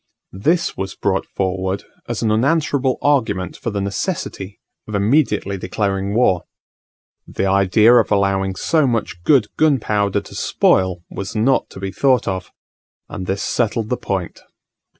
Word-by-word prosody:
This 160 - 0
was 95 0 -5
brought 95 -1 -1
forward 95 0 -2 0.2
as 120 -1 -3
an 110 - +2
unanswerable 140 +2 +1
argument 110 - +1
for 130 - -4
the 100 -2 -3
necessity 100 - -4 0.3
of 105 - -4
immediately 105 -3 +1
declaring 100 0 -2
war: 95 -8 +2 0.8
the - - -2
idea 100 +4 +4
of 120 -3 +4
allowing 95 -1 +1
so 155 - +2
much 115 -7 -2
good 125 - +3
gunpowder 105 -9 +2
to - - -14
spoil 90 -2 +1
was 100 +3 -6
not 120 +5 +2
to - - -11
be 95 0 -4
thought 130 +4 +2
of; 95 -2 -3 0.6
and 95 - -6
this 95 +1 -2
settled 115 -2 -1
the 125 - +1
point. 95 -3 -4
100 Hz, 145 wpm, -19 LUFS, 95-120 Hz, 0.8 s, idea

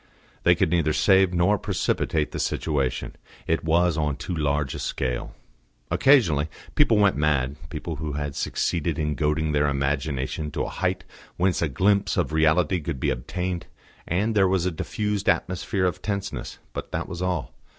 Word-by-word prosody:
They - - +5
could - - +1
neither 80 -3 +2
save 95 0 +4
nor 90 +3 +2
precipitate 75 -2 0
the - - -4
situation; 70 -5 -1 0.3
it 80 - 0
was 85 0 +2
on 75 -2 0
too 90 - -5
large 75 -3 0
a - - -5
scale. 60 -2 -3 0.6
Occasionally 85 - +4 0.2
people 120 -7 +4
went 100 -2 +4
mad 70 -3 +1
people 80 -3 -5
who 75 -1 -4
had 70 -1 -3
succeeded 85 -2 -1
in 75 -1 0
goading 75 +2 0
their 75 0 +2
imagination 70 +1 -1
to - - -1
a - - -3
height - - -1 0.3
whence 90 0 +1
a 80 - +1
glimpse 100 +9 +2
of - - 0
reality 80 +3 +3
could 75 -2 -4
be - - +1
obtained; 90 +7 -3 0.4
and 100 +6 +1
there 100 -3 +4
was 90 -2 +1
a 90 - +1
diffused 105 +5 -2
atmosphere 95 +2 0
of 90 - -1
tenseness. 100 - -4 0.2
But - - -6
that - - -3
was 85 - -6
all. 90 -8 -2
80 Hz, 170 wpm, -25 LUFS, 75-95 Hz, 0.6 s, They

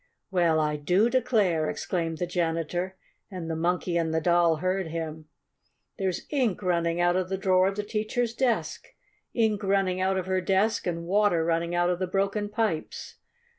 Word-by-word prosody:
"Well, 170 -4 +3
I 150 -1 0
do 180 +10 +2
declare!" 210 -11 +2
exclaimed 165 -3 -2
the 175 - -1
janitor, 175 +1 -2 0.3
and 180 -4 -6
the - - -2
Monkey 175 +1 0
and 165 -1 0
the 160 - +1
Doll 170 0 +3
heard 185 +3 -1
him. 160 -1 -5 0.7
"There's 190 -3 -2
ink 245 -9 0
running 170 -1 0
out 175 0 +3
of 185 0 -1
the 190 - -1
drawer 185 -1 +3
of 195 - -2
the 210 - -2
teacher's 220 +3 -2
desk! 245 -1 -1 0.5
Ink 220 -3 +1
running 195 -2 +1
out 190 0 +1
of 185 - -2
her 185 0 0
desk, 195 +3 +1
and 170 -1 -3
water 195 -3 +2
running 170 +1 0
out 175 0 +2
of 175 - -2
the 185 - -1
broken 200 +2 -1
pipes! 210 -7 -3
185 Hz, 175 wpm, -27 LUFS, 170-200 Hz, 0.7 s, Well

